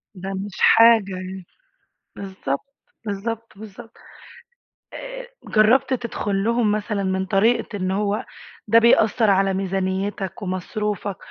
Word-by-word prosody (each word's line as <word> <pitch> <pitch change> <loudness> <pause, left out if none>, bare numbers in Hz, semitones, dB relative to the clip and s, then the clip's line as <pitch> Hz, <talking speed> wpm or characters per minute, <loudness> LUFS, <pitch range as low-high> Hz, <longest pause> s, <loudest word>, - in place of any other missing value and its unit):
ده 190 +1 -6
مش 195 +1 -6
حاجة 225 -4 +6
يعني، 185 0 -7 0.7
بالضبط، 190 - -5 0.3
بالضبط، 225 +3 -4
بالضبط. 220 +2 -11 1.0
آآ - - -8 0.2
جرّبت 245 +5 +3
تدخُل 210 -5 -2
لهم 230 -1 +1
مثلًا 210 -1 -2
من 190 0 -1
طريقة 205 +3 +1
إن 185 -1 -2
هو 205 +1 -1 0.4
ده 225 +2 +6
بيأثّر 225 -1 +4
على 195 0 +3
ميزانيّتك 190 +1 -3
ومصروفك، 200 +1 -3
205 Hz, 110 wpm, -22 LUFS, 190-225 Hz, 1.0 s, حاجة